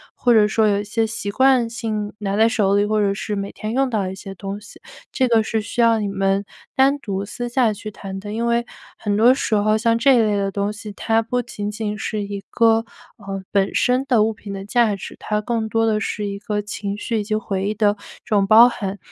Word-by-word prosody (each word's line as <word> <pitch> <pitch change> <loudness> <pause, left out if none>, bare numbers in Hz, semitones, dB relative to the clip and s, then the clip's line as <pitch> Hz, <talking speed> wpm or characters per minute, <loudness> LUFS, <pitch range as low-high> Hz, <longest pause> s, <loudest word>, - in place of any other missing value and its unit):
或 245 - +3
者 215 -2 +5
说 220 0 +2
有 200 -1 +2
一 - - -6
些 225 +2 0
习 220 -2 -4
惯 260 +1 +3
性 215 -2 -3
拿 200 -1 -2
在 220 +2 +4
手 205 -4 +1
里 205 - +3
或 215 0 +1
者 200 -1 +2
是 210 +1 -4
每 200 0 -4
天 215 +1 -5
用 270 +2 +2
到 220 - 0
的 185 - -3
一 - - -7
些 195 0 -9
东 195 +1 -6
西， 210 - -15 0.3
这 260 - +1
个 230 -2 +3
是 220 0 -1
需 230 +3 -2
要 230 -1 +4
你 210 - -2
们 195 0 0 0.3
单 270 +2 +4
独 200 -8 -4
私 240 +4 -5
下 240 -2 +2
去 215 +1 -8
谈 195 -1 -7
的。 205 +1 -7
因 230 +2 -1
为 235 0 +1 0.3
很 205 -1 -1
多 225 +4 +6
时 255 - -2
候 215 +1 +3
像 230 +1 +2
这 270 +2 +5
一 - - +4
类 215 -2 +2
的 200 -1 -1
东 200 +1 -2
西， 215 0 -8
它 225 +2 +1
不 245 +2 -2
仅 205 -3 -5
仅 210 0 -3
是 215 0 -3
一 200 0 -5
个， 225 -1 +4 0.4
呃， 195 -1 -6
本 195 -1 +1
身 250 +1 +2
的 235 -5 +4
物 220 +1 0
品 210 -1 -10
的 195 0 -6
价 225 -1 +2
值， 195 - -9
它 210 0 -1
更 225 0 -2
多 225 +1 +1
的 215 -1 +1
是 210 0 -3
一 200 0 -4
个 210 0 -3
情 205 -1 -5
绪 230 +1 -2
以 - - -2
及 215 +1 -2
回 195 -2 -2
忆 215 - -2
的 210 -1 +3 0.3
这 215 - 0
种 200 -1 +3
包 225 +3 +8
含。 205 -5 -4
215 Hz, 270 characters per minute, -21 LUFS, 200-230 Hz, 0.4 s, 包